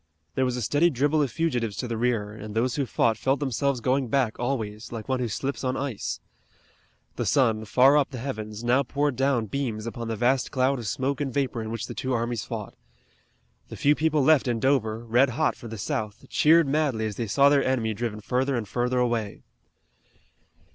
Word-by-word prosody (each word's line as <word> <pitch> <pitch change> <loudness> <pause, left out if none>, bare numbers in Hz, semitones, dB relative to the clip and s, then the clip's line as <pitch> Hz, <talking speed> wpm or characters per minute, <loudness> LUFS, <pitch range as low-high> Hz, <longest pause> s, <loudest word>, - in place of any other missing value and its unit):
There 130 - +1
was 125 -1 -1
a 125 - -2
steady 145 +10 +3
dribble 145 +2 +1
of 140 - +1
fugitives 120 -9 -1
to 125 - -3
the 115 - -3
rear, 115 -3 0
and 105 0 -8
those 120 +2 +1
who 140 -1 -1
fought 110 -1 +1
felt 135 +1 +1
themselves 140 -1 -1
going 130 +2 +1
back 120 -2 0
always, 115 -4 -3
like 115 -2 -6
one 130 -1 0
who 125 - -1
slips 135 +7 -3
on 130 0 -1
ice. 135 -6 -3 1.0
The - - -1
sun, 115 -6 +2
far 130 +6 +5
up 140 -2 +2
the 130 - -7
heavens, 110 -4 -5
now 125 +3 +3
poured 140 +1 -1
down 135 -3 +1
beams 115 -2 -3
upon 115 0 -5
the 115 - -2
vast 125 +4 +1
cloud 130 0 +1
of 115 - -5
smoke 135 +7 -1
and 140 -2 -1
vapor 130 -3 -1
in 110 - -5
which 115 -1 -4
the - - -7
two 130 -1 -2
armies 120 -2 -1
fought. - - -6 1.0
The - - -8
few 145 - +4
people 155 -1 +1
left 150 -2 +4
in 120 -2 0
Dover, 115 -4 +1
red 120 +4 +3
hot 155 -1 +2
for 120 - -10
the 110 0 -7
South, 105 +1 -4
cheered 160 0 +5
madly 135 -6 0
as 105 -2 -4
they 115 - -2
saw 140 +6 +5
their 140 -1 +3
enemy 120 -4 0
driven 110 -1 -4
further 130 +5 0
and 115 -3 -3
further 125 +4 -1
away. 120 -4 -1
125 Hz, 210 wpm, -26 LUFS, 115-140 Hz, 1.0 s, far